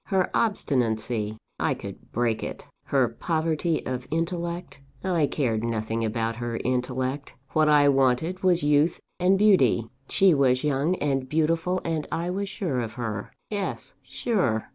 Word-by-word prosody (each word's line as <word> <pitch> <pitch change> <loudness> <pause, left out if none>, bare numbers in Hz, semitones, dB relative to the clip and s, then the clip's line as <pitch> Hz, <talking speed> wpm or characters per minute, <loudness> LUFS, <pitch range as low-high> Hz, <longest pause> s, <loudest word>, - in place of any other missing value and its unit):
Her 190 -3 +1
obstinacy? 115 - 0 0.2
I - - +1
could - - -10
break 115 -1 0
it. - - -6 0.2
Her 135 -3 +3
poverty 160 +5 -1
of 130 -1 -4
intellect? 170 -1 -3 0.2
I 170 -6 +2
cared 115 -8 -1
nothing 115 0 -1
about 115 +1 -1
her 120 -1 -3
intellect. 130 +2 -2 0.2
What 155 +1 +3
I 145 -1 +6
wanted 135 +7 +2
was 180 -3 +3
youth 150 +3 +3 0.2
and 185 +2 +4
beauty; 170 - +4 0.2
she 195 -2 +5
was 130 -2 +3
young 150 +4 +1
and 135 -5 -1
beautiful 165 +4 +1
and 160 -3 -1
I 170 +2 -1
was 200 +1 -2
sure 170 -10 -2
of 115 -2 -3
her. 110 -3 -4 0.2
"Yes; 200 -2 -4
sure. 180 - -1
145 Hz, 145 wpm, -26 LUFS, 120-170 Hz, 0.2 s, I